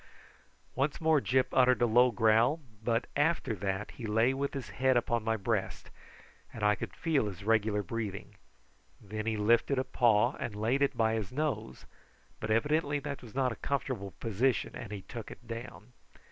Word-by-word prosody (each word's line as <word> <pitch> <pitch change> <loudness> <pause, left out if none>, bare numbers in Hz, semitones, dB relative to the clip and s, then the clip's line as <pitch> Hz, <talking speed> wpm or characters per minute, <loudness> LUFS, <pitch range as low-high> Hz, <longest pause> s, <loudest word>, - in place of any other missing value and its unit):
Once 140 +3 -1
more 160 -3 +3
Gyp 130 0 +2
uttered 130 -1 +4
a 120 - +4
low 120 +2 +5
growl; 115 +6 +3 0.2
but 115 +1 +1
after 145 -4 +1
that 100 0 -3
he 115 - -7
lay 115 +4 +3
with 140 +1 -3
his 135 - -5
head 130 -1 +2
upon 120 -1 0
my 115 0 0
breast, 105 -1 -2 0.6
and 110 - -7
I 105 0 +5
could - - -6
feel 155 -10 +1
his 100 -1 -7
regular 110 -1 +2
breathing. 100 0 -5 0.7
Then 110 +2 -6
he 110 -1 0
lifted 115 +6 +3
a 130 - +2
paw 120 -1 +3
and 105 - -4
laid 115 +6 0
it 140 - +1
by 110 -1 +2
his 110 -4 -3
nose, 130 -6 -3 0.5
but 110 - -4
evidently 145 +6 +1
it 140 0 -5
was 120 -1 -13
not 130 -2 +1
a - - -5
comfortable 125 -8 -3
position, 115 +4 0
and 110 - -7
he 100 -2 -6
took 115 -3 -8
it 120 - -12
down. 115 0 -8
115 Hz, 180 wpm, -31 LUFS, 110-130 Hz, 0.7 s, low